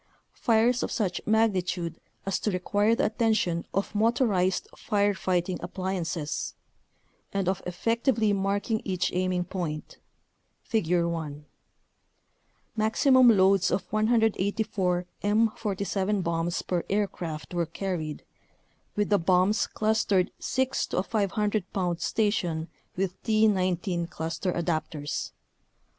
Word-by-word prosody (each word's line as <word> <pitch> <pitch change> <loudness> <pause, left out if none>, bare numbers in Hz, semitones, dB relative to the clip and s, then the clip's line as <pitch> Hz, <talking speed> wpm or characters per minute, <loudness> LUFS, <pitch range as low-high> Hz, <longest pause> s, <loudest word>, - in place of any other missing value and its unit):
fires 235 +2 +2
of - - -1
such 185 -6 -1
magnitude 185 -6 +1 0.2
as 195 - 0
to - - -1
require 205 +4 +2
the 275 - +1
attention 215 -6 +1
of 195 +2 -2
motorized 210 -4 +2
fire 205 -1 +1
fighting 180 -1 -1
appliances) 175 -4 -3 0.8
and 195 -2 -1
of 190 0 0
effec 230 +6 -1
tively 225 -6 +2
marking 200 +3 0
each 180 -2 -1
aiming 180 0 0
point 170 -4 -5 0.6
(Figure 175 -5 +1
1). 150 -3 -4 1.3
Maximum 250 +4 +4
loads 195 -3 +5
of 190 - 0
184 210 -4 +1 0.2
M47 205 -2 0
bombs 170 +1 -1
per 175 -2 -1
aircraft 180 -6 -2
were 170 -2 0
carried, 165 -3 -4 0.7
with 210 -1 0
the 205 - +4
bombs 185 +4 +3
clustered 215 -4 +1
six 260 0 0
to - - -4
a 185 - +2
500 205 -1 -1
pound 175 -3 -1
station 175 -7 0 0.3
with 190 0 -2
T19 185 -5 +1
cluster 165 +3 -3
adapters. 160 -4 -2
190 Hz, 110 wpm, -27 LUFS, 175-215 Hz, 1.3 s, loads